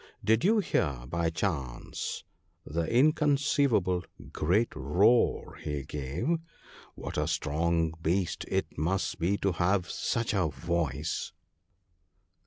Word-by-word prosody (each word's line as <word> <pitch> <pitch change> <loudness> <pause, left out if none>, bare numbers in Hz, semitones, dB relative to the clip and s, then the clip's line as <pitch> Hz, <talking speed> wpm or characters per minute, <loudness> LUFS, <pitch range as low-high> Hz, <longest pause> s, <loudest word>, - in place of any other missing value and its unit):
Did 110 +1 +3
you 220 +4 +4
hear 75 - 0
by 85 +3 0
chance 75 -7 -3 0.4
the 85 +2 -1
inconceivable 140 - +3 0.3
great 100 +9 +2
roar 100 - +2
he 75 -2 -3
gave? 75 - -2 0.6
What - - -4
a - - 0
strong 80 +1 0
beast 85 +2 0
it - - -2
must 90 +5 -1
be 90 +5 +1
to 100 - +1
have 90 +1 +1
such 115 -2 -1
a 95 -5 +2
voice 80 -3 -2
85 Hz, 110 wpm, -29 LUFS, 80-110 Hz, 0.6 s, you